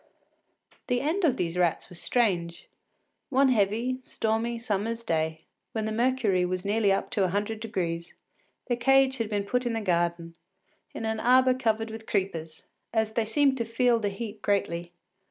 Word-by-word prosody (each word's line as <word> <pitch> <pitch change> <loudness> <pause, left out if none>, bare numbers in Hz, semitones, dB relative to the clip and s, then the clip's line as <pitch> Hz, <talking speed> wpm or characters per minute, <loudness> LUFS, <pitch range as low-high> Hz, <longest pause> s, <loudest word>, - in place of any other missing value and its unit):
The 245 -1 +1
end 320 +9 -1
of 270 -6 +3
these 175 0 -2
rats 175 -2 +1
was 175 - -9
strange. 175 -8 0 0.6
One 270 0 +4
heavy, 230 +3 +1
stormy 225 0 -1
summer’s 230 0 -2
day, 160 -4 -1 0.3
when 220 -1 -1
the 220 - -2
mercury 230 -5 +2
was 180 +1 -2
nearly 205 0 +2
up 195 - -1
to 200 - +1
a - - +3
hundred 205 +3 -2
degrees, 175 -7 -3 0.5
their 240 -2 -1
cage 270 +1 +4
had 225 -2 -1
been 205 -2 -1
put 250 +4 0
in 240 -2 -1
the 225 - -1
garden, 170 -3 0 0.6
in 225 - -4
an 220 0 -1
arbour 255 +2 +5
covered 225 -3 -1
with 220 0 -9
creepers, 165 -6 -2 0.3
as 220 -1 +1
they 225 -1 +1
seemed 265 +4 +2
to - - +1
feel 230 +1 +2
the 205 -2 -1
heat 210 +1 -7
greatly. 175 -4 -1
220 Hz, 175 wpm, -27 LUFS, 185-240 Hz, 0.6 s, arbour